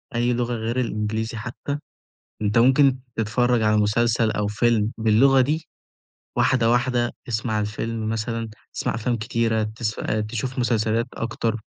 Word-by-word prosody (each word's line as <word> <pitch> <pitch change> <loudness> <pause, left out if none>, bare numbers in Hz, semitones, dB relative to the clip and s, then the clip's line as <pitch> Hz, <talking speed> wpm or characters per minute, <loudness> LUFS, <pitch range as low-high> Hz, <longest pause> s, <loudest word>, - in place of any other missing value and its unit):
أي 120 +1 +2
لغة 120 0 -1
غير 115 +2 -2
الإنجليزي 110 -1 -2
حتى 120 +6 -4 0.6
أنت 105 0 +1
ممكن 130 +2 +5 0.2
تتفرّج 120 +2 +1
على 105 0 +3
مسلسل 110 +1 +2
أو 105 -1 -1
فيلم 110 0 +1
باللغة 115 +5 +5
دي، 155 +5 -1 0.7
واحدة، 120 -3 +3
واحدة، 120 0 +1 0.2
اسمع 110 -2 -1
الفيلم 110 +1 -3
مثلًا 115 0 -2 0.2
تسمع - - -2
أفلام 120 +2 -1
كتيرة 110 0 0
تسفأ 110 0 -2
تشوف 120 +4 -4
مسلسلات 115 -1 +1
أكتر 115 0 -2
115 Hz, 135 wpm, -23 LUFS, 110-120 Hz, 0.7 s, ممكن